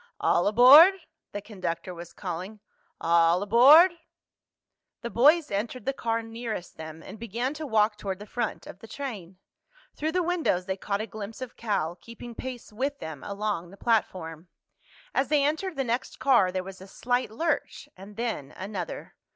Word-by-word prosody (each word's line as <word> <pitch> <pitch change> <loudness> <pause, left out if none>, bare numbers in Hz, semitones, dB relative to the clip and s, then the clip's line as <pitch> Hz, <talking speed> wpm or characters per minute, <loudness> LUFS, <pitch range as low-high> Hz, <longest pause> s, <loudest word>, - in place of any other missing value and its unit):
"All 175 - +2
aboard!" 270 - +8 0.4
the 205 - -6
conductor 185 -4 -5
was 170 0 -10
calling. 185 +3 -6 0.4
"All 170 +2 +3
aboard!" 275 - +7 1.1
The 235 - -5
boys 300 +5 +4
entered 220 +5 -3
the 270 - 0
car 230 -3 -2
nearest 225 -5 -6
them 160 0 -9
and 215 - -10
began 235 +4 -3
to 305 0 -6
walk 215 -3 +2
toward 195 -3 -4
the 205 - -10
front 235 +1 -4
of 185 - -11
the 225 - -12
train. 210 -10 -7 0.6
Through 315 +2 -2
the 365 -1 +1
windows 330 - 0
they 190 - -2
caught 200 +1 -3
a - - -3
glimpse 215 0 -8
of 255 -2 -7
Cal, 180 -7 -2
keeping 235 +3 -11
pace 245 -2 -8
with 275 +6 -2
them 160 - -8
along 200 -4 -3
the 195 - -14
platform. 185 -7 -1 0.7
As 270 - +1
they 295 -2 +2
entered 320 +5 -1
the 270 - -1
next 240 0 -3
car 240 -9 +3
there 185 0 -3
was 190 0 -10
a 190 - -11
slight 245 +4 -1
lurch, 295 +4 -2
and 195 +2 -12
then 225 - -4
another. 190 -3 -6
220 Hz, 170 wpm, -27 LUFS, 190-255 Hz, 1.1 s, aboard